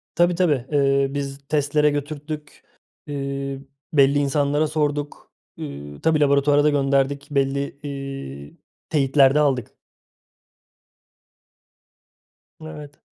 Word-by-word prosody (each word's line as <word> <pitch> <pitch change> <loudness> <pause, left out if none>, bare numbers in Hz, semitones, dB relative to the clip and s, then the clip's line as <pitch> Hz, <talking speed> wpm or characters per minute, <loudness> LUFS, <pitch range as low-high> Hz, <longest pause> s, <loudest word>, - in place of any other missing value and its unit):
Tabii, 175 +1 +3
tabii, 150 -9 +1
ııı, 140 -1 +2
biz 140 -1 -3
testlere 150 0 +2
götürttük. 150 +1 -5 0.4
Iıı, 140 -1 -4 0.3
belli 140 0 +5
insanlara 145 +2 +1
sorduk. 145 -1 -2 0.3
Iıı, 70 +1 -8
tabii, 160 -1 +2
laboratuvara 145 0 +4
da 150 - +5
gönderdik. 140 0 +1
Belli, 140 0 -1
iii, 135 - -7 0.3
teyitler 135 -2 +4
de 150 - +4
aldık. 130 -4 0 2.9
Evet. 150 -2 -10
140 Hz, 95 wpm, -22 LUFS, 135-150 Hz, 2.9 s, belli